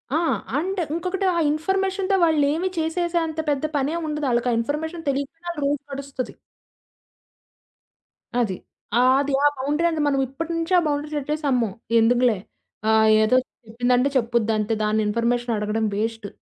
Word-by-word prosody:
ఆ! - - +4 0.4
అండ్ 380 +6 -2 0.2
ఇంకొకటి. 365 +3 -2
ఆ - - +2
ఇన్‌ఫర్‌మేషన్‌తో 385 +4 0
వాళ్ళేమి 315 +2 +2
చేసేసే 340 +2 0
అంత 315 0 -5
పెద్ద 285 -1 0
పనేముండదు. 300 +1 -1
ఆళ్ళకా 240 +1 +1
ఇన్‌ఫర్‌మేషన్ 320 +6 -3
తెలీక 275 0 -1 0.2
ఆళ్ళ 340 - -5
రూట్ 285 0 0
నడుస్తది. 275 -2 -5 2.1
అది. 215 -6 0 0.4
ఆ! - - +5 0.2
అది 285 0 -2
ఆ - - +8
బౌండరీ 290 +5 0
అనేది 320 -2 -1
మనమిప్పటి 275 +4 -1
నుంచే 330 +2 -1
ఆ - - 0
బౌండరీ 295 0 -1
సెట్ 290 -1 -4
చేసి, 305 +1 -2
అమ్మో! 240 -4 +2 0.3
ఎందుకులే 240 0 +3 0.5
ఆహ్, 220 0 +5 0.2
ఏదో 215 +4 +3 0.3
చెప్పిందంటే 245 +3 +1
చెప్పుద్ది 235 -3 +1
అంతే 215 +1 0
దాన్ని 215 +1 +1
ఇన్‌ఫర్మేషన్ 235 +2 0
అడగడం 210 +1 -1
వేస్ట్ 225 0 -2
280 Hz, 145 wpm, -23 LUFS, 235-320 Hz, 2.1 s, ఆ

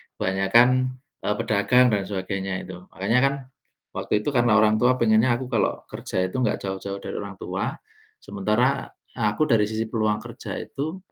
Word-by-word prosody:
kebanyakan, 95 +6 +4 0.5
e - - -4
pedagang 125 +5 +3
dan 100 -2 +1
sebagainya 95 -1 -3
itu. - - -8 0.2
Makanya 105 +6 +1
kan, 140 - +2 0.6
waktu 105 - -1
itu 145 - -1
karena 120 -2 +4
orang 110 0 +4
tua 125 +2 +4
pengennya 115 +2 +4
aku 130 - -5
kalau 115 - 0
kerja 95 0 -2
itu 95 - -6
enggak 110 - +1
jauh-jauh 100 +1 -4
dari - - -6
orang 100 -1 -7
tua, - - -3 0.5
sementara 105 +7 0 0.3
aku 110 +7 +1
dari 105 -2 +4
sisi 110 +1 -2
peluang 110 -2 +1
kerja - - -7
itu, 160 +7 -5
110 Hz, 160 wpm, -24 LUFS, 100-120 Hz, 0.6 s, kebanyakan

